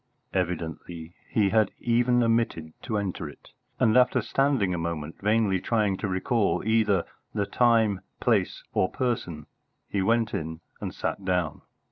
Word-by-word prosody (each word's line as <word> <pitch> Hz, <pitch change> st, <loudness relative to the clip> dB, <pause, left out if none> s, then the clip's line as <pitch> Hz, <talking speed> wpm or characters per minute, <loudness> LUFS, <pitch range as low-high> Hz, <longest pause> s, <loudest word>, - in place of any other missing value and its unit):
Evidently 85 Hz, -2 st, -3 dB, 0.2 s
he 105 Hz, -3 st, +2 dB
had 110 Hz, -1 st, +3 dB
even 120 Hz, +1 st, +3 dB
omitted 115 Hz, -9 st, 0 dB
to 110 Hz, -4 st, -2 dB
enter 90 Hz, -6 st, -3 dB
it; 75 Hz, -, -16 dB, 0.3 s
and 110 Hz, 0 st, +4 dB
after 125 Hz, 0 st, +5 dB
standing 135 Hz, -9 st, +1 dB
a -, -, -1 dB
moment 80 Hz, -2 st, -4 dB
vainly 105 Hz, -2 st, +2 dB
trying 105 Hz, -4 st, +1 dB
to 105 Hz, -, -3 dB
recall 100 Hz, +4 st, +1 dB
either 110 Hz, -5 st, +2 dB, 0.3 s
the 100 Hz, -, +1 dB
time, 110 Hz, -4 st, +3 dB, 0.2 s
place, 110 Hz, -7 st, +1 dB
or 95 Hz, -, +2 dB
person, 90 Hz, -, -2 dB, 0.4 s
he 100 Hz, -, -1 dB
went 115 Hz, +3 st, +2 dB
in 80 Hz, 0 st, -4 dB, 0.2 s
and -, -, -5 dB
sat 100 Hz, -, -3 dB
down. 90 Hz, -5 st, -1 dB
100 Hz, 145 wpm, -27 LUFS, 90-115 Hz, 0.4 s, after